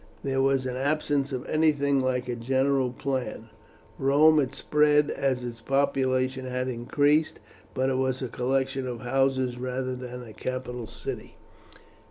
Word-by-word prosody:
There 135 Hz, -1 st, 0 dB
was 135 Hz, -1 st, +2 dB
an 125 Hz, -1 st, -3 dB
absence 145 Hz, 0 st, 0 dB
of 130 Hz, -2 st, -4 dB
anything 145 Hz, -3 st, +2 dB
like 130 Hz, -1 st, -1 dB
a 120 Hz, -, -2 dB
general 130 Hz, +2 st, +1 dB
plan. 125 Hz, -4 st, -4 dB, 0.5 s
Rome 150 Hz, +3 st, +5 dB
had 135 Hz, -2 st, -1 dB
spread 150 Hz, 0 st, +3 dB
as 130 Hz, -2 st, -1 dB
its 120 Hz, -2 st, -6 dB
population 130 Hz, -1 st, +1 dB
had 125 Hz, 0 st, -2 dB
increased, 145 Hz, +5 st, +1 dB, 0.4 s
but 130 Hz, +1 st, +1 dB
it 130 Hz, -, 0 dB
was 130 Hz, -1 st, 0 dB
a -, -, -1 dB
collection 130 Hz, +2 st, -1 dB
of 120 Hz, -2 st, -5 dB
houses 130 Hz, -1 st, +1 dB
rather 130 Hz, 0 st, -3 dB
than 125 Hz, 0 st, -7 dB
a 110 Hz, -3 st, -11 dB
capital 125 Hz, -2 st, -5 dB
city. -, -, -7 dB
130 Hz, 150 wpm, -27 LUFS, 125-140 Hz, 0.5 s, Rome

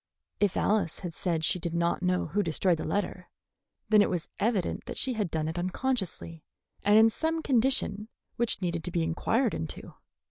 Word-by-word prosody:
If 205 Hz, -2 st, +2 dB
Alice 200 Hz, -6 st, +1 dB
had 175 Hz, -3 st, -5 dB
said 165 Hz, -1 st, -1 dB
she 180 Hz, -, +2 dB
did 170 Hz, 0 st, -3 dB
not 170 Hz, +1 st, +1 dB
know 180 Hz, 0 st, +1 dB
who 205 Hz, -, 0 dB
destroyed 170 Hz, -1 st, +1 dB
the -, -, -3 dB
letter, 185 Hz, +1 st, -2 dB, 0.6 s
then 215 Hz, -1 st, +6 dB
it -, -, +3 dB
was 175 Hz, -3 st, -3 dB
evident 205 Hz, -4 st, 0 dB
that 245 Hz, -, -5 dB
she 260 Hz, -, +1 dB
had 210 Hz, -6 st, -1 dB
done 155 Hz, -1 st, -1 dB
it 165 Hz, +2 st, -3 dB
unconsciously 185 Hz, -4 st, -2 dB, 0.4 s
and 205 Hz, +1 st, +5 dB
in 225 Hz, +1 st, +7 dB
some 320 Hz, +5 st, -1 dB
condition 235 Hz, -5 st, +1 dB, 0.3 s
which 235 Hz, -4 st, 0 dB
needed 170 Hz, -2 st, -1 dB
to 175 Hz, -, +1 dB
be 170 Hz, -1 st, 0 dB
inquired 220 Hz, +9 st, +1 dB
into. 80 Hz, -, -5 dB
185 Hz, 185 wpm, -29 LUFS, 170-220 Hz, 0.6 s, in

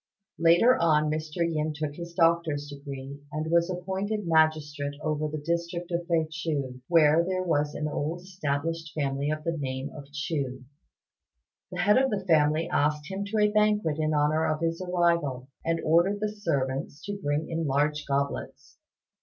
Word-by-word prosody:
Later 170 Hz, +10 st, +5 dB
on 155 Hz, -2 st, +3 dB
Mr. 155 Hz, +2 st, -1 dB
Yin 155 Hz, -1 st, -1 dB
took 150 Hz, -1 st, -3 dB
his 170 Hz, +2 st, -8 dB
doctor's 165 Hz, -4 st, +2 dB
degree, 140 Hz, -1 st, -8 dB
and 155 Hz, +2 st, -3 dB
was 170 Hz, +1 st, +3 dB
appointed 190 Hz, +4 st, -2 dB
magistrate 155 Hz, -3 st, +1 dB
over 155 Hz, 0 st, -1 dB
the 155 Hz, +1 st, -4 dB
district 170 Hz, +3 st, -3 dB
of 170 Hz, 0 st, -2 dB
Fei 165 Hz, -3 st, +2 dB
ch'iu, 145 Hz, -5 st, -3 dB
where 165 Hz, -1 st, +5 dB
there 185 Hz, +1 st, -1 dB
was 150 Hz, -4 st, 0 dB
an 150 Hz, -, -2 dB
old 155 Hz, +3 st, -3 dB
established 165 Hz, -3 st, -3 dB
family 140 Hz, -1 st, -1 dB
of 155 Hz, 0 st, -2 dB
the 170 Hz, +1 st, -1 dB
name 135 Hz, -2 st, -4 dB
of 140 Hz, -1 st, -10 dB
Chu. 140 Hz, -3 st, -3 dB, 1.1 s
The -, -, -2 dB
head 210 Hz, +4 st, +5 dB
of 265 Hz, 0 st, +2 dB
the 195 Hz, -4 st, -2 dB
family 155 Hz, -2 st, +3 dB
asked 150 Hz, +2 st, 0 dB
him 195 Hz, +1 st, -3 dB
to 210 Hz, +2 st, -3 dB
a 210 Hz, 0 st, +4 dB
banquet 210 Hz, -7 st, +2 dB
in 155 Hz, 0 st, +1 dB
honour 150 Hz, +2 st, +2 dB
of 155 Hz, 0 st, -1 dB
his 165 Hz, +1 st, -1 dB
arrival, 170 Hz, -8 st, 0 dB
and 165 Hz, 0 st, 0 dB
ordered 175 Hz, +6 st, +3 dB
the 210 Hz, 0 st, 0 dB
servants 140 Hz, -4 st, -2 dB
to 205 Hz, -1 st, -4 dB
bring 145 Hz, +2 st, 0 dB
in 165 Hz, -1 st, -3 dB
the 160 Hz, -3 st, -1 dB
large 145 Hz, +2 st, +1 dB
goblets. 140 Hz, 0 st, -3 dB
155 Hz, 170 wpm, -27 LUFS, 145-170 Hz, 1.1 s, Later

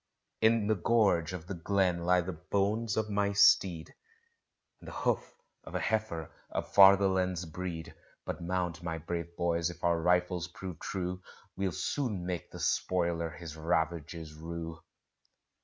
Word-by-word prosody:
In 110 Hz, -1 st, +4 dB
the 110 Hz, -, +3 dB
gorge 95 Hz, -5 st, +2 dB
of 90 Hz, -3 st, -6 dB
the 95 Hz, -, -5 dB
glen 90 Hz, -1 st, 0 dB
lie 90 Hz, 0 st, +4 dB
the 90 Hz, +1 st, -4 dB
bones 105 Hz, +6 st, -1 dB
of 110 Hz, -1 st, +1 dB
my 100 Hz, 0 st, +1 dB
steed, 90 Hz, -4 st, +4 dB, 0.9 s
And -, -, -14 dB
the -, -, -6 dB
hoof -, -, -1 dB, 0.3 s
of -, -, -9 dB
a -, -, +1 dB
heifer 110 Hz, -8 st, -1 dB, 0.2 s
of -, -, -4 dB
fatherland's 95 Hz, -2 st, +5 dB
breed: 80 Hz, 0 st, -6 dB, 0.3 s
But -, -, -4 dB
mount, 90 Hz, -1 st, -2 dB
my 85 Hz, -1 st, -3 dB
brave 85 Hz, +1 st, -5 dB
boys, 85 Hz, -1 st, +1 dB
if 85 Hz, -, -11 dB
our 85 Hz, -1 st, +2 dB
rifles 90 Hz, 0 st, +2 dB
prove 90 Hz, -1 st, -8 dB
true, 90 Hz, -1 st, -3 dB, 0.3 s
We'll 95 Hz, -1 st, -1 dB
soon 105 Hz, -, -2 dB
make 90 Hz, -2 st, -4 dB
the -, -, -10 dB
spoiler 85 Hz, -2 st, 0 dB
his 80 Hz, 0 st, -9 dB
ravages 80 Hz, -1 st, -2 dB
rue. 80 Hz, +1 st, -6 dB
90 Hz, 150 wpm, -31 LUFS, 85-95 Hz, 0.9 s, fatherland's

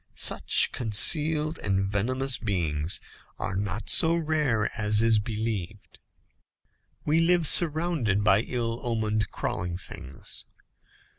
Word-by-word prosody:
Such -, -, +3 dB
concealed 150 Hz, +7 st, +2 dB
and 95 Hz, -1 st, -1 dB
venomous 125 Hz, +7 st, -2 dB
beings 85 Hz, -6 st, -2 dB, 0.4 s
are 95 Hz, -, -4 dB
not 100 Hz, +2 st, -4 dB
so 165 Hz, +1 st, +3 dB
rare 150 Hz, -9 st, -1 dB
as 105 Hz, 0 st, +1 dB
is 115 Hz, -2 st, +3 dB
believed. 105 Hz, -3 st, -6 dB, 1.1 s
We 155 Hz, +2 st, +2 dB
live 170 Hz, 0 st, +2 dB
surrounded 155 Hz, -, +3 dB
by 100 Hz, 0 st, +3 dB
ill 115 Hz, -1 st, -3 dB
omened 110 Hz, -4 st, -2 dB
crawling 90 Hz, +2 st, -4 dB
things. 65 Hz, -6 st, -9 dB
110 Hz, 105 wpm, -26 LUFS, 100-150 Hz, 1.1 s, Such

